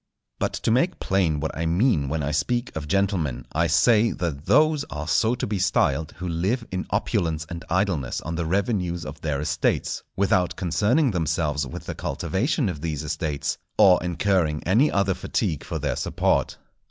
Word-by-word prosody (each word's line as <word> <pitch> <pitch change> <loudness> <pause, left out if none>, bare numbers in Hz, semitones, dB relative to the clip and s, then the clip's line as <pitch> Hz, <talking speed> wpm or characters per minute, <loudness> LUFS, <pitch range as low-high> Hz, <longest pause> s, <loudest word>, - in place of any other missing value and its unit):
But - - -1
to - - -1
make 160 +9 +1
plain 90 -6 +1
what - - -3
I 80 0 -1
mean 85 - +2
when 75 +1 -1
I 75 - -1
speak 120 - -1
of 75 -2 -4
gentlemen, 95 -7 0
I 85 +2 +1
say 105 +8 +4
that 80 -4 -4
those 150 +1 +4
are 75 0 -6
so 110 +7 +2
to - - -3
be 105 -2 -2
styled 85 -4 +1
who 90 - -6
live 95 +9 -1
in 95 0 -3
opulence 85 -7 -1
and 85 -1 -6
idleness 90 -8 0
on 85 - -5
the 85 -1 -2
revenues 90 -2 -1
of - - -8
their 75 -3 -1
estates, 75 - 0
without 95 -2 +2
concerning 105 - +2
themselves 75 -5 -1
with - - -8
the - - -4
cultivation 125 - -1
of 80 -6 -4
these 80 -2 -3
estates, 75 -1 -2 0.2
or 90 -2 +6
incurring 90 -3 0
any 115 - +3
other 100 -1 +2
fatigue 75 -4 -2
for - - -4
their - - -1
support. - - 0
90 Hz, 175 wpm, -24 LUFS, 80-100 Hz, 0.2 s, or